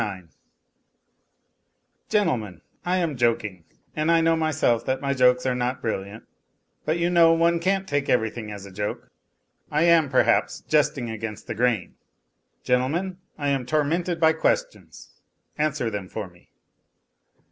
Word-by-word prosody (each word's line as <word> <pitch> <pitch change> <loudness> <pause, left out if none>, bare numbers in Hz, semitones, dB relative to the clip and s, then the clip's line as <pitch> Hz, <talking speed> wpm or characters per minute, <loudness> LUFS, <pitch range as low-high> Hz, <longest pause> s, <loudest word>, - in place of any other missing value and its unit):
IX 95 -5 -6 1.7
Gentlemen, 125 - 0 0.2
I 180 +1 0
am 165 -5 -1
joking, 115 -7 0 0.3
and 155 +1 0
I 170 0 +5
know 165 0 +3
myself 155 -7 +1
that 130 0 0
my 140 0 -1
jokes 125 -1 +3
are 130 - +1
not 125 +1 -2
brilliant, 105 -1 -4 0.6
but 155 +2 0
you 170 +1 0
know 165 -1 +6
one 170 +1 +2
can't 190 +2 0
take 145 -3 -1
everything 110 -2 0
as 100 -1 -8
a 100 - -11
joke. 105 +2 -5 0.6
I 150 +2 +1
am, 170 -4 +4
perhaps, 130 - +2
jesting 140 -5 0
against 110 -1 -6
the 115 - -4
grain. 115 -4 0 0.7
Gentlemen, 165 +10 0 0.2
I 145 -1 -1
am 135 -2 0
tormented 165 +4 0
by 160 -1 +5
questions; - - -2 0.5
answer 150 -6 0
them 100 -3 -5
for 105 -3 -5
me. 85 -1 -22
135 Hz, 145 wpm, -24 LUFS, 110-165 Hz, 1.7 s, know